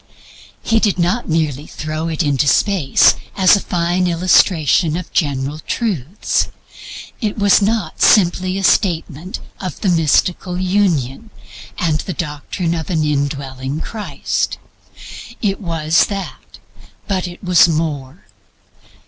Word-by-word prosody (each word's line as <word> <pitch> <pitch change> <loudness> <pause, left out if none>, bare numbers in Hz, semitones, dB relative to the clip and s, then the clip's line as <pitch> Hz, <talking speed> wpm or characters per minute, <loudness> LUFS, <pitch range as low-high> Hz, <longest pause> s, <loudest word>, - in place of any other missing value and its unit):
He 225 - +2
did 210 -4 +1
not 180 +6 0
merely 155 -3 -1
throw 155 +1 -4
it 165 +1 -1
into 145 -1 +1
space 180 -5 +4 0.2
as 190 -1 +6
a - - 0
fine 175 0 0
illustration 170 -2 +3
of 180 - -8
general 145 -1 -1
truths. 185 - -1 0.7
It 215 -2 -2
was 205 -1 +4
not 205 -5 -1
simply 185 -1 +3
a 195 - -3
statement 175 -3 0 0.2
of 185 -2 -6
the 195 - +1
mystical 175 +2 +1
union, 185 - 0 0.5
and 160 -3 0
the 185 - -4
doctrine 165 +2 -3
of 165 0 -4
an 160 -4 0
indwelling 140 -1 -2
Christ. 215 +4 -3 0.8
It 200 -1 -1
was 165 -3 +1
that; 195 -2 -7 0.5
but 185 -2 -1
it 175 +2 -11
was 180 -2 +5
more. 155 -2 -3
170 Hz, 125 wpm, -17 LUFS, 150-190 Hz, 0.8 s, as